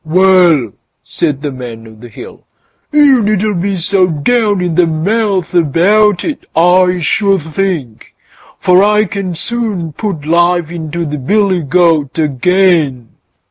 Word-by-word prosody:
"Well!" 170 Hz, -, +3 dB, 0.3 s
said 145 Hz, -4 st, -3 dB
the 145 Hz, -, -3 dB
Man 120 Hz, -3 st, -9 dB
o' 110 Hz, -, -14 dB
the 115 Hz, +2 st, -14 dB
Hill, 110 Hz, -, -12 dB, 0.5 s
"you 290 Hz, -4 st, +4 dB
needn't 210 Hz, -3 st, -1 dB
be 195 Hz, 0 st, -2 dB
so 185 Hz, +2 st, +1 dB
down 205 Hz, +6 st, 0 dB
in 180 Hz, -2 st, -2 dB
the 175 Hz, +1 st, +2 dB
mouth 190 Hz, +3 st, -1 dB
about 180 Hz, +5 st, +2 dB
it, 305 Hz, -, -5 dB
I 180 Hz, +2 st, +3 dB
should 195 Hz, +2 st, 0 dB
think, 165 Hz, -, -4 dB, 0.4 s
for 180 Hz, +1 st, +3 dB
I 210 Hz, +1 st, +3 dB
can 190 Hz, -2 st, -5 dB
soon 205 Hz, -6 st, -4 dB
put 175 Hz, -5 st, -5 dB
life 170 Hz, 0 st, +1 dB
into 170 Hz, 0 st, -5 dB
the 150 Hz, -1 st, -5 dB
billy 195 Hz, +5 st, 0 dB
goat 160 Hz, -2 st, +1 dB
again." 155 Hz, -4 st, +1 dB
180 Hz, 140 wpm, -12 LUFS, 155-200 Hz, 0.5 s, you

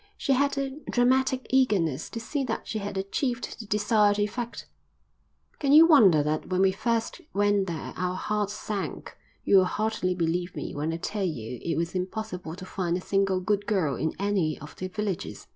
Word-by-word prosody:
She 275 Hz, -, +1 dB
had 280 Hz, +2 st, +1 dB
a 275 Hz, +1 st, -3 dB
dramatic 260 Hz, +1 st, +2 dB
eagerness 190 Hz, -, +2 dB
to 230 Hz, -, -5 dB
see 275 Hz, +5 st, -2 dB
that 225 Hz, -, -4 dB
she 220 Hz, -, -3 dB
had 200 Hz, -1 st, -5 dB
achieved 240 Hz, +6 st, -2 dB
the 220 Hz, -, -8 dB
desired 210 Hz, 0 st, +3 dB
effect. 230 Hz, +3 st, -3 dB, 0.9 s
"Can 280 Hz, -1 st, +2 dB
you 315 Hz, +2 st, +10 dB
wonder 205 Hz, -, +6 dB
that 155 Hz, +1 st, -2 dB
when 185 Hz, 0 st, +1 dB
we 190 Hz, 0 st, +5 dB
first 230 Hz, +3 st, -1 dB
went 205 Hz, -1 st, +2 dB
there 165 Hz, -2 st, -5 dB
our 180 Hz, +1 st, -2 dB
hearts 210 Hz, +1 st, -1 dB
sank? 210 Hz, -2 st, -5 dB, 0.3 s
You'll 190 Hz, -2 st, +5 dB
hardly 195 Hz, -2 st, -1 dB
believe 175 Hz, +1 st, -1 dB
me 145 Hz, -, -5 dB
when 150 Hz, +3 st, -2 dB
I 165 Hz, -, -2 dB
tell 200 Hz, +4 st, -3 dB
you 125 Hz, -9 st, -4 dB
it 170 Hz, -, -2 dB
was 170 Hz, +1 st, -1 dB
impossible 185 Hz, -3 st, -4 dB
to 185 Hz, +1 st, -9 dB
find 180 Hz, -2 st, -1 dB
a -, -, -4 dB
single 195 Hz, 0 st, +1 dB
good 205 Hz, +2 st, 0 dB
girl 180 Hz, -10 st, +1 dB
in 160 Hz, +4 st, -2 dB
any 190 Hz, -6 st, 0 dB
of 150 Hz, -, -11 dB
the 185 Hz, -, -4 dB
villages." 200 Hz, -1 st, -4 dB
200 Hz, 185 wpm, -27 LUFS, 180-225 Hz, 0.9 s, you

